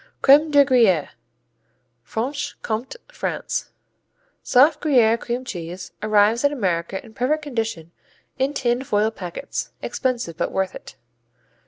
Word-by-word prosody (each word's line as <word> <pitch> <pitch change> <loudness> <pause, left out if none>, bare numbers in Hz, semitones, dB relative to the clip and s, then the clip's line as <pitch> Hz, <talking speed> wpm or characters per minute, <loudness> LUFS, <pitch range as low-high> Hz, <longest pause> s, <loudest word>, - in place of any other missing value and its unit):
Crème 290 +3 +6
de 285 -1 +6
Gruyère 225 - +3 0.9
Franche 250 - -4
Comté 225 - -3 0.2
France - - -3 0.7
Soft 285 +4 +4
Gruyère 235 -6 +4
cream 245 +2 -4
cheese, 175 -3 -7
arrives 215 +3 +3
in 285 - +4
America 190 -7 -2
in 220 - -15
perfect 295 +7 0
condition 225 - -4 0.5
in 275 +2 0
tin 245 0 0
foil 215 -3 +1
packets. 180 -6 -5
Expensive 240 -10 -2
but - - -1
worth 190 -1 -1
it. - - -11
235 Hz, 125 wpm, -22 LUFS, 200-270 Hz, 0.9 s, Crème